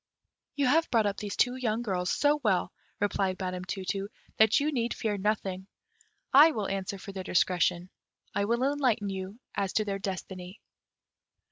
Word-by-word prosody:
"You 285 -1 +1
have 320 +6 +3
brought 225 -3 +3
up 200 0 -1
these 205 -2 -4
two 250 0 +3
young 235 -2 -1
girls 180 -5 -1
so 295 +1 +2
well," 190 -4 +1 0.3
replied 195 -2 0
Madam 185 -1 -3
Tu 190 0 -5
tu, 195 +1 -2 0.3
"that 220 0 +5
you 295 +2 0
need 240 -4 -1
fear 215 -2 -1
nothing: 195 -2 -2 0.7
I 295 +4 +9
will 210 -3 -2
answer 195 0 -3
for 195 - -9
their 190 -1 -6
discretion; 180 0 +1 0.4
I 200 0 +1
will 235 +4 +1
enlighten 260 -7 +1
you 190 +3 -6
as 195 -1 -2
to 215 - +1
their 195 -1 -2
destiny." 185 0 -6
200 Hz, 170 wpm, -29 LUFS, 190-235 Hz, 0.7 s, I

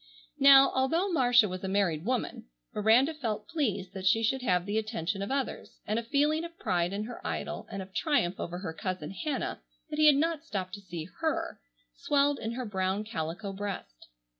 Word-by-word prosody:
Now, 275 0 +8
although 325 +9 +1
Marcia 245 -7 +5
was 185 0 -6
a - - -2
married 190 -5 0
woman, 250 0 -2 0.3
Miranda 230 +8 +4
felt 220 -8 -3
pleased 205 - -2
that 190 -1 -3
she 225 +4 +4
should 260 +4 +1
have 180 -7 +1
the 205 +2 0
attention 205 -3 -3
of 200 - -3
others, 275 -1 -3
and 215 +2 0
a - - -5
feeling 295 +6 +1
of 335 0 -8
pride 175 -1 0
in 200 +2 -2
her 235 +2 -8
idol, - - -4
and 195 -1 -4
of 190 0 -16
triumph 260 - +1
over 175 +1 -4
her 180 -3 -5
cousin 185 -4 -4
Hannah 295 +7 -3 0.3
that 300 - -3
he 305 - +7
had 295 - +8
not 320 +1 0
stopped 190 - -4
to 200 - -7
see 170 -4 -6
her, 320 -2 -1 0.3
swelled 285 - +1
in 225 +1 -3
her 255 +1 -4
brown 190 0 -1
calico 195 0 -4
breast. 190 - -6
215 Hz, 195 wpm, -29 LUFS, 190-275 Hz, 0.3 s, Now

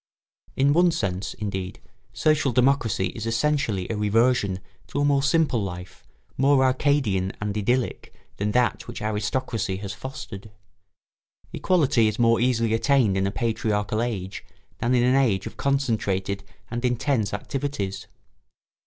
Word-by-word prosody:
In 140 +2 +3
one 175 +2 +5
sense, 100 - -2
indeed, 95 -3 -4 0.3
social 155 -3 +2
democracy 120 -7 +2
is 110 +4 -6
essentially 115 -5 0
a - - -1
reversion 105 -2 +2 0.3
to - - -3
a 145 - +2
more 140 -1 +3
simple 150 -4 +2
life, 90 -2 -7 0.4
more 135 0 +4
Arcadian 130 -8 +1
and 105 -1 -3
idyllic 120 +4 -1 0.3
than 105 +1 -1
that 125 -1 +1
which 120 - -7
aristocracy 110 -1 -2
has 100 0 -6
fostered. 110 -2 -8 1.0
Equality 145 -11 +2
is 110 0 -2
more 115 -1 +4
easily 115 -2 +1
attained 115 -3 +3
in 95 0 +1
a - - -2
patriarchal 110 -2 -1
age 100 -6 -4 0.4
than 120 +3 +1
in 120 - +3
an 125 +1 +3
age 115 -9 +2
of - - -7
concentrated 105 -8 -1 0.3
and 120 +1 -3
intense 125 -3 0
activities. 105 -4 -4
115 Hz, 135 wpm, -24 LUFS, 100-135 Hz, 1.0 s, one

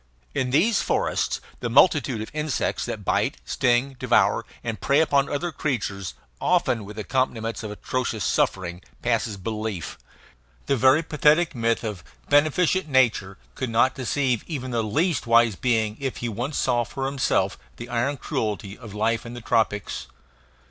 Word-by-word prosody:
In 130 - 0
these 180 - +3
forests - - 0 0.2
the 120 - -3
multitude 135 -3 +4
of - - -10
insects 150 -3 -1
that - - -5
bite, - - +1
sting, 130 +2 +1
devour, - - +3 0.2
and 115 -2 -4
prey 140 +2 +3
upon 140 -3 +3
other 165 +4 -2
creatures, 100 - -3 0.2
often 110 -4 +1
with 105 +1 -10
accompaniments 115 -1 -1
of 110 - -5
atrocious 110 0 -3
suffering, 90 -2 0 0.2
passes 115 -3 0
belief. 105 -2 -4 0.7
The 140 - +2
very 130 +6 +5
pathetic 155 +2 +3
myth 115 -1 0
of 105 -7 -4 0.3
"beneficent 155 +5 +3
nature" 115 -8 +2 0.2
could 130 - -3
not 120 +3 +3
deceive 130 -1 0
even 130 -6 -4
the 115 -1 +1
least 145 - 0
wise 115 -2 +5
being 110 -1 0
if 135 -2 -3
he 120 - -3
once 120 +7 -3
saw 120 -1 +2
for 135 +3 -5
himself 135 - 0 0.2
the 120 - -7
iron 125 +4 -1
cruelty 105 -5 -3
of 115 -4 -11
life 110 +2 +1
in 120 0 -8
the - - -6
tropics. 110 -3 0
120 Hz, 155 wpm, -24 LUFS, 110-140 Hz, 0.7 s, very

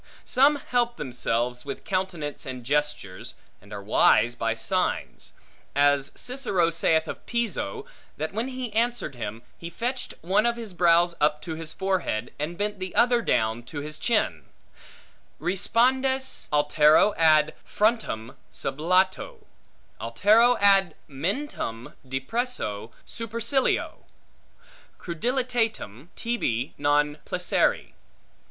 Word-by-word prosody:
Some 280 +3 +4
help 240 -4 -1
themselves 125 -2 -2
with 140 -1 -6
countenance 180 -6 -3
and 130 -1 -6
gesture, 140 -8 -1 0.4
and 100 +1 -18
are 100 -1 -6
wise 110 +2 +4
by - - -1
signs; - - -2 0.4
as 145 -1 +3
Cicero 225 -10 0
saith 160 -1 +2
of - - -7
Piso, 235 - -2 0.3
that 155 +5 -3
when 225 +4 -2
he 255 -4 -5
answered 235 - 0
him, 115 -2 -6 0.2
he 170 - -6
fetched 245 +8 -4
one 200 +7 +2
of 235 - +1
his 225 -5 -7
brows 175 0 +4
up 150 0 +3
to 165 - -4
his 160 0 -3
forehead, 185 - -2
and 160 +4 -3
bent 205 0 -2
the 185 -1 -5
other 240 0 +4
down 110 - 0
to 145 +3 -6
his 150 +1 -5
chin; 230 -3 0 0.9
Respondes, 260 +8 +1
altero 150 +6 +4
ad 155 -1 +4
frontem 210 - -1 0.2
sublato, 185 +7 0 0.6
altero 215 - +4
ad 195 -4 +4
mentum 145 - -4
depresso 135 - -2 0.2
supercilio, 230 +4 -1 1.0
crudelitatem 225 - -2
tibi 145 - -2
non 145 +1 +2
placere. - - 0
170 Hz, 115 wpm, -26 LUFS, 140-230 Hz, 1.0 s, Some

